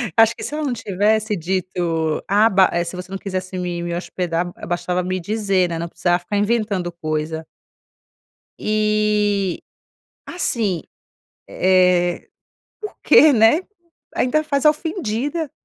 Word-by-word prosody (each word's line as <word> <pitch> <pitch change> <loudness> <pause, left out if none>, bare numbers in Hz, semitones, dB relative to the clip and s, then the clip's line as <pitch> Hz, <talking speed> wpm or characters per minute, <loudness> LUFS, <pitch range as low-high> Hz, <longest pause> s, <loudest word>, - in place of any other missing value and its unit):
Acho 225 +1 +5
que - - -8
se - - -4
ela 305 +1 -2
não 275 -4 -1
tivesse 210 +1 0
dito: 170 -3 -2
"Ah, 210 +3 +4
ba, 190 -2 +4
eh, 170 - +1
se 170 +1 -6
você 180 0 -8
não 195 - -3
quisesse 185 -1 -5
me 175 -1 -3
me 170 0 -3
hospedar, 175 -1 -3
eh, - - -8
bastava 175 +1 -1
me 185 +1 -2
dizer, 195 -1 0
né, 165 -1 -3
não 170 - -3
precisava 175 +1 0
ficar 185 +4 -3
inventando 205 -4 0
coisa". 160 -1 -4 1.1
E 210 -3 +1 0.6
assim, 225 - -1 0.7
eh, 180 -1 +2 0.5
porque, 315 -7 +4
né, 225 +8 +5 0.5
ainda 310 +5 +1
faz 285 -2 -1
a - - +9
ofendida, 300 - -2
190 Hz, 140 wpm, -20 LUFS, 175-220 Hz, 1.1 s, a